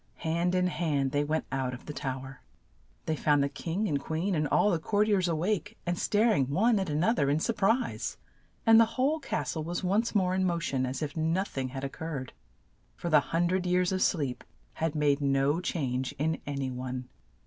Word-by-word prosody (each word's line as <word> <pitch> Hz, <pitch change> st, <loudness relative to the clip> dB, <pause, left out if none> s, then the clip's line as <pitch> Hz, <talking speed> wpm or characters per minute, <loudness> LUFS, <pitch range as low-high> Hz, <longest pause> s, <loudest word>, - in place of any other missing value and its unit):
Hand 170 Hz, +3 st, +1 dB
in 180 Hz, 0 st, +2 dB
hand 150 Hz, -7 st, 0 dB
they 145 Hz, +1 st, +1 dB
went 155 Hz, +2 st, -1 dB
out 130 Hz, -1 st, -1 dB
of 120 Hz, -, -13 dB
the 150 Hz, -, -6 dB
tow 130 Hz, -2 st, -3 dB
er. 135 Hz, -1 st, -11 dB, 0.6 s
They 160 Hz, -, 0 dB
found 145 Hz, -1 st, +3 dB
the 140 Hz, -, 0 dB
king 170 Hz, +8 st, -2 dB
and 145 Hz, -6 st, 0 dB
queen 165 Hz, +7 st, -2 dB
and 155 Hz, -3 st, +1 dB
all 205 Hz, -, +3 dB
the 170 Hz, -, +1 dB
court 205 Hz, +5 st, +1 dB
iers 195 Hz, -4 st, +2 dB
a 165 Hz, -, +1 dB
wake, 175 Hz, +2 st, -1 dB
and 175 Hz, 0 st, 0 dB
star 215 Hz, +6 st, +2 dB
ing 135 Hz, -8 st, +1 dB
one 210 Hz, +9 st, +3 dB
at 190 Hz, -3 st, -2 dB
an 150 Hz, +2 st, 0 dB
oth 225 Hz, +5 st, +2 dB
er 140 Hz, -, +2 dB
in 145 Hz, +2 st, +2 dB
sur 230 Hz, -, 0 dB
prise, 225 Hz, +4 st, 0 dB, 0.5 s
and 225 Hz, -1 st, +8 dB
the 230 Hz, 0 st, +2 dB
whole 285 Hz, +5 st, +2 dB
cas 275 Hz, -, -2 dB
tle 160 Hz, -, -3 dB
was 175 Hz, +3 st, -3 dB
once 210 Hz, +6 st, +1 dB
more 185 Hz, -2 st, +2 dB
in 190 Hz, 0 st, +1 dB
mo 175 Hz, -2 st, +1 dB
tion 135 Hz, -5 st, -1 dB
as 130 Hz, +4 st, -3 dB
if 145 Hz, -, -4 dB
noth 165 Hz, +5 st, -1 dB
ing 135 Hz, -1 st, -1 dB
had 135 Hz, +1 st, -5 dB
oc 135 Hz, -, -8 dB
curred, 145 Hz, -6 st, -4 dB, 0.6 s
for 170 Hz, -, -4 dB
the 150 Hz, -, +7 dB
hun 170 Hz, +1 st, +2 dB
dred 180 Hz, +1 st, 0 dB
years 180 Hz, 0 st, +2 dB
of 185 Hz, 0 st, -1 dB
sleep 140 Hz, -10 st, 0 dB, 0.3 s
had 160 Hz, -1 st, -2 dB
made 145 Hz, -1 st, +2 dB
no 140 Hz, +2 st, +2 dB
change 130 Hz, -7 st, -2 dB
in 160 Hz, +3 st, -1 dB
an 140 Hz, -1 st, -3 dB
y 135 Hz, -, -1 dB
one. 125 Hz, 0 st, -5 dB
160 Hz, 230 wpm, -29 LUFS, 140-185 Hz, 0.6 s, and